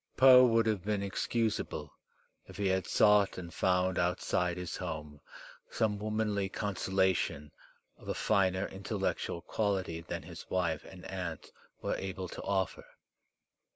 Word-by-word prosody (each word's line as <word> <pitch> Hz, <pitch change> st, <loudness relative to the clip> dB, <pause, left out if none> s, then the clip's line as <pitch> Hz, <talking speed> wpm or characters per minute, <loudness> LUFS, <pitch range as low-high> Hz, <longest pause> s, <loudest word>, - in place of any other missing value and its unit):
Poe 130 Hz, -1 st, +9 dB
would 115 Hz, -2 st, +4 dB
have 105 Hz, -5 st, 0 dB
been 105 Hz, -1 st, -1 dB
excusable 110 Hz, +2 st, -2 dB, 0.5 s
if -, -, -11 dB
he 100 Hz, -, -1 dB
had 95 Hz, 0 st, 0 dB
sought 105 Hz, -2 st, +4 dB
and 85 Hz, -2 st, -7 dB
found 90 Hz, 0 st, +1 dB
outside 90 Hz, 0 st, 0 dB
his 90 Hz, -1 st, -4 dB
home 75 Hz, -4 st, -6 dB, 0.5 s
some 105 Hz, -2 st, 0 dB
womanly 105 Hz, -2 st, -1 dB
consolation 95 Hz, -7 st, 0 dB, 0.5 s
of -, -, -15 dB
a -, -, -1 dB
finer 95 Hz, 0 st, +2 dB
intellectual 95 Hz, -2 st, -3 dB
quality 95 Hz, -6 st, -1 dB
than 80 Hz, -, -5 dB
his -, -, -10 dB
wife 85 Hz, -4 st, 0 dB
and 90 Hz, -1 st, -12 dB
aunt 90 Hz, -4 st, -5 dB, 0.3 s
were -, -, 0 dB
able 95 Hz, -1 st, -4 dB
to -, -, -7 dB
offer. 95 Hz, -2 st, -1 dB
95 Hz, 135 wpm, -32 LUFS, 90-105 Hz, 0.5 s, Poe